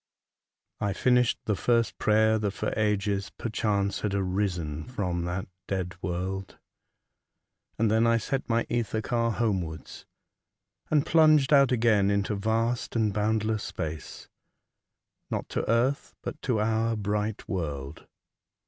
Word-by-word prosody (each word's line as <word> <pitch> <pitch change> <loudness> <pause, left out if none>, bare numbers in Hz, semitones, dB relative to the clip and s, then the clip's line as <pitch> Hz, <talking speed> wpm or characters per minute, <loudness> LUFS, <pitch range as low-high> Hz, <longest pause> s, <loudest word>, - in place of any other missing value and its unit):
I 100 -1 0
FINISHED 125 +3 +3
the 105 - +1
first 115 +4 +1
prayer 110 +1 +3
that 100 -2 -1
for - - -2
ages, 105 -2 0
perchance, 105 -3 -1
had 100 -2 -1
arisen 90 -6 -1
from 90 -8 -2
that 90 +2 -3 0.2
dead 95 -2 -2
world, 95 +2 -4 1.2
and 110 -1 +2
then 110 +1 +4
I 115 0 +4
set 135 +4 -3
my 115 0 +2
ether 115 -2 -1
car 115 0 0
homewards, 95 -9 -3 0.8
and 150 -2 +3
plunged 155 -3 +5
out 140 -2 +6
again 110 -5 +3
into 100 +1 +1
vast 115 +5 -1
and 110 -3 +2
boundless 110 +1 0
space, 80 -5 -6 1.0
not - - -3
to - - -2
earth, 125 +5 +1
but - - -6
to 125 -5 0
our 115 +1 +1
bright 105 0 -2
world. 75 -6 -4
105 Hz, 130 wpm, -27 LUFS, 95-115 Hz, 1.2 s, out